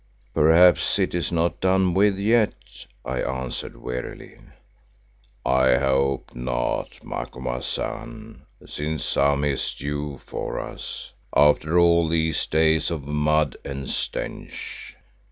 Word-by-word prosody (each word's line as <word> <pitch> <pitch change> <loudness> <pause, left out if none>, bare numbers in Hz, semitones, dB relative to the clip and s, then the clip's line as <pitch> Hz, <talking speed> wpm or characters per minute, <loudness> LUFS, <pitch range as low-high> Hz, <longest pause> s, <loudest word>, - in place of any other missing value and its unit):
"Perhaps 85 +4 +5
it - - 0
is 85 -2 -1
not 85 0 0
done 95 -1 +3
with 100 +1 +3
yet," 110 +2 +3 0.5
I 65 0 -2
answered 65 0 -4
wearily. 60 0 -6 1.1
"I 65 0 +4
hope 70 0 0
not, - - -3
Macumazahn, 110 - -5 0.2
since 75 +1 -3
some 70 0 +2
is 70 -2 -1
due 75 0 -4
for - - -4
us, - - -7 0.2
after 75 +3 +4
all 85 -1 +5
these 80 -1 0
days 80 0 +3
of 80 -5 -4
mud 75 0 +1
and 70 -1 -5
stench. - - -5
75 Hz, 110 wpm, -24 LUFS, 70-85 Hz, 1.1 s, Perhaps